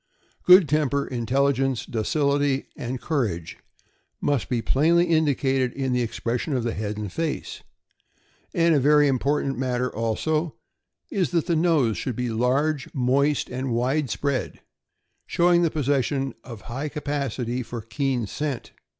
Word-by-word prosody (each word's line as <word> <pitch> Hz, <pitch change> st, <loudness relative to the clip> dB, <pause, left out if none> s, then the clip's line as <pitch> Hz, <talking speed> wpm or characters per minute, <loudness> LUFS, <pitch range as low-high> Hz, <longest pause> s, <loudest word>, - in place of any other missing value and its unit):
Good 180 Hz, -2 st, +7 dB
temper, 140 Hz, -1 st, +1 dB
intelligence, 130 Hz, +1 st, 0 dB
docility, 140 Hz, +4 st, 0 dB
and 130 Hz, -2 st, -4 dB
courage 110 Hz, -, -2 dB, 0.6 s
must 140 Hz, -5 st, 0 dB
be 125 Hz, -, 0 dB
plainly 165 Hz, +9 st, +3 dB
indicated 135 Hz, -6 st, +1 dB
in 135 Hz, -2 st, -2 dB
the 125 Hz, -, +1 dB
expression 120 Hz, +4 st, -2 dB
of 120 Hz, -, -2 dB
the 115 Hz, -, -1 dB
head 105 Hz, 0 st, -4 dB
and 105 Hz, -4 st, -5 dB
face; 165 Hz, -2 st, -3 dB, 0.9 s
and 170 Hz, 0 st, +3 dB
a 145 Hz, -, +4 dB
very 145 Hz, +2 st, +5 dB
important 135 Hz, 0 st, 0 dB
matter, 125 Hz, -1 st, -1 dB
also, 150 Hz, +9 st, -1 dB, 0.6 s
is 185 Hz, -4 st, 0 dB
that 170 Hz, -3 st, 0 dB
the 170 Hz, -, +1 dB
nose 155 Hz, -9 st, +2 dB
should 130 Hz, -, -3 dB
be 125 Hz, 0 st, -2 dB
large, 135 Hz, +5 st, 0 dB
moist, 140 Hz, +3 st, +2 dB
and 130 Hz, 0 st, -2 dB
wide 130 Hz, +4 st, 0 dB
spread, 130 Hz, +7 st, -2 dB, 0.7 s
showing 175 Hz, 0 st, +3 dB
the 170 Hz, -, +3 dB
possession 135 Hz, -2 st, 0 dB
of 115 Hz, -4 st, -9 dB
high 135 Hz, +7 st, -5 dB
capacity 140 Hz, -5 st, -3 dB
for 120 Hz, 0 st, -6 dB
keen 125 Hz, +1 st, -2 dB
scent. 140 Hz, +4 st, -4 dB
135 Hz, 140 wpm, -24 LUFS, 125-150 Hz, 0.9 s, Good